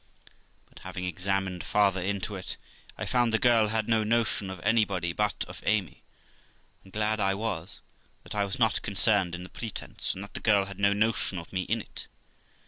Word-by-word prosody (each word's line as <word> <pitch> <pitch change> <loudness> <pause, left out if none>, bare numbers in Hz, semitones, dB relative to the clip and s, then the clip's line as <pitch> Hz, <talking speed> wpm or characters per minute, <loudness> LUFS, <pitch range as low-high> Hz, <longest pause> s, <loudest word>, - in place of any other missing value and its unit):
But, - - -16
having 90 - -6
examined 95 +1 -1
farther 100 -2 +2
into 100 +2 -2
it, 95 - -5 0.4
I - - -3
found 120 -2 +2
the 110 - +3
girl 115 -2 +4
had 110 0 +1
no 110 -1 +3
notion 110 -3 +1
of 95 -2 -6
anybody 95 -5 +2
but 105 +3 0
of - - -10
Amy; 100 -3 0 0.8
and 95 - -16
glad 110 +1 +1
I 95 -1 +2
was, 95 -5 -4 0.4
that - - -8
I 105 -1 +1
was 100 -1 -3
not 110 -3 +2
concerned 100 -3 +3
in 90 - -7
the 90 - -10
pretence, 115 -3 -3
and 95 - -6
that 100 - -11
the - - -3
girl 100 -3 +3
had 100 0 -8
no 100 0 +4
notion 105 -2 +1
of 85 +1 -8
me 95 - 0
in 115 0 0
it. - - -8
100 Hz, 195 wpm, -28 LUFS, 95-110 Hz, 0.8 s, girl